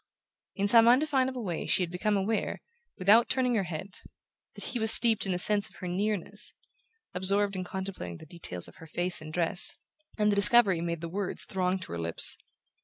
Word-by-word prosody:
In 200 0 -1
some 230 +2 +5
undefinable 260 -1 +1
way 175 -5 -5
she 185 - +1
had 170 - -6
become 205 +3 -1
aware, 210 +3 -3 0.4
without 210 +6 +3
turning 255 -2 0
her 205 -5 -1
head, 175 +2 -7 0.7
that - - -6
he 245 - -4
was 220 0 +2
steeped 225 -3 +5
in - - -2
the 180 - -1
sense 205 +3 +2
of - - -22
her 180 - -8
nearness, 200 +2 -1 0.6
absorbed 200 +2 +1
in 185 - -4
contemplating 185 - -7
the - - -14
details 145 - -6
of - - -17
her 160 - -14
face 175 +2 +1
and 155 0 -10
dress; 175 +3 +2 0.4
and 210 -1 +1
the - - 0
discovery 200 -3 +6
made 170 -1 -4
the 170 - -6
words 190 +3 -4
throng 185 0 -2
to 185 - -10
her 85 - -5
lips. 85 0 0
195 Hz, 195 wpm, -27 LUFS, 175-215 Hz, 0.7 s, discovery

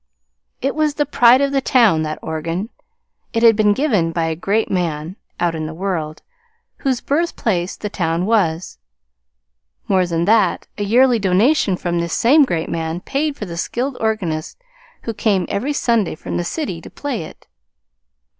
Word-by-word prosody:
It 275 - +1
was 305 -2 0
the 295 - +1
pride 250 -2 +5
of 280 0 +1
the 275 -1 +1
town 230 -11 +4
that 155 0 -3
organ. 165 +6 -3 0.6
It 230 0 0
had 230 -2 +7
been 210 -1 +3
given 205 - +1
by 165 0 -1
a 160 0 -1
great 200 +7 -1
man 170 -2 -2 0.2
(out 175 -1 +1
in 155 -1 -4
the 155 - -7
world) 165 -4 -3 0.5
whose 265 -4 -1
birthplace 230 - -1
the 210 - -4
town 170 -3 -1
was. 185 -6 0 1.1
More 185 -2 +2
than 170 0 -1
that, 210 -3 +2
a 205 - -3
yearly 240 +3 +4
donation 200 +2 +2
from 175 -1 -2
this 170 0 -2
same 285 +5 +5
great 165 -9 -2
man 165 +1 -3
paid 280 +5 -2
for 210 - -5
the 170 -3 -7
skilled 250 +9 -2
organist 180 -8 -2 0.5
who 230 - -3
came 200 -4 +1
every 250 +9 -1
Sunday 235 - +1
from - - -6
the 175 - -1
city 180 - -4
to - - -11
play 275 -9 -4
it. 155 - -11
200 Hz, 170 wpm, -19 LUFS, 170-245 Hz, 1.1 s, had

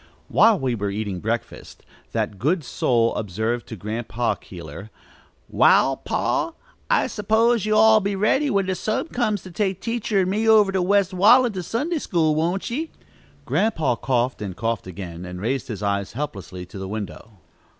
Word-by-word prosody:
While 225 -3 +5
we 130 -3 -1
were 105 -3 -2
eating 100 -2 -3
breakfast, 115 +4 -5 0.3
that 100 - -2
good 155 - +1
soul 115 -3 +1
observed 110 +4 -2
to 110 - -7
Grandpa 115 +3 -2
Keeler: 90 0 -10 0.6
"Wall, - - +4
pa, - - -1 0.4
I - - +3
suppose 220 +1 +1
you'll 215 +1 +6
be 200 0 -2
all - - -5
ready 270 +8 +2
when 200 -5 +1
the 190 - -1
time 215 - -2
comes 215 -6 -1
to 185 - -10
take 190 0 -1
teacher 230 -3 0
and 185 0 0
me 220 +3 +1
over 210 -3 +6
to 190 -1 0
West 195 0 +2
Wallen 225 +6 +5
to 185 - -3
Sunday 290 - -2
school, 165 - +1
won't 170 +8 -1
ye?" 310 +6 -3 0.6
Grandpa 160 - +1
coughed, 125 0 -1
and 95 -4 -5
coughed 115 -2 -2
again, 90 -2 -7
and 90 0 -7
raised 120 +6 -2
his 105 -3 -6
eyes 100 -1 -1
helplessly 95 -9 -6
to 95 +2 -10
the 95 - -5
window. 105 0 -7
150 Hz, 170 wpm, -23 LUFS, -, 0.6 s, you'll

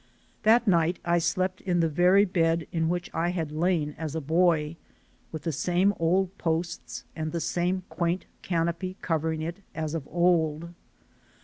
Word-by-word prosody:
That 225 +2 +4
night 170 -1 +3
I 175 0 +3
slept 185 +3 -1
in 180 -2 0
the 165 - +3
very 180 +6 +4
bed 165 -3 +1
in 165 -1 0
which 175 0 -3
I 170 +1 0
had 165 -4 -2
lain 155 -2 0
as 160 -2 -4
a - - 0
boy, 160 0 +2 0.6
with 160 -2 -6
the 165 - -1
same 180 +6 +2
old 185 +3 +1
posts 165 +1 -2
and 155 -1 -3
the 170 - -2
same 180 +3 -1
quaint 170 +1 -1 0.2
canopy 170 +2 -2
covering 160 -1 -1
it 170 +3 -4 0.2
as 155 -1 -3
of 155 -4 -4
old. 170 -2 +1
170 Hz, 165 wpm, -27 LUFS, 160-180 Hz, 0.6 s, That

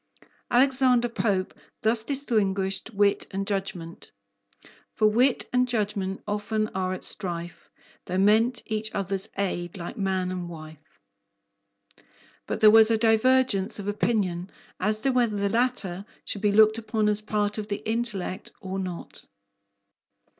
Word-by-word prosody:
Alexander 255 -1 +4
Pope 200 -5 -1 0.3
thus 220 0 +2
distinguished 210 -8 -1
wit 205 -1 +2
and 195 0 -3
judgment: 195 -4 -5 0.8
For 215 - +2
wit 240 +5 +3
and 250 0 +3
judgment 205 -5 -2
often 210 +1 -1
are 185 -1 -2
at 185 - -4
strife, 175 -2 -4 0.4
Though 185 - -3
meant 220 +5 +3
each 215 -1 -2
other's 195 -1 -1
aid 175 -2 -2
like 175 +2 -7
man 190 -2 0
and 180 -1 -5
wife. 155 -7 -12 1.5
But - - -3
there 215 -1 +8
was 220 0 +7
a 225 - +3
divergence 225 -2 +3
of 200 -1 -6
opinion 200 -4 -1 0.3
as 215 +3 0
to 270 - +2
whether 240 -4 +1
the 200 0 0
latter 225 -6 -1 0.2
should 200 - -5
be 210 -1 +2
looked 215 +2 +5
upon 220 -1 -1
as 210 0 +2
part 210 0 -1
of 210 - -5
the 205 0 -5
intellect 220 -5 -2
or 190 0 -5
not. 180 -2 -7
210 Hz, 140 wpm, -26 LUFS, 190-225 Hz, 1.5 s, there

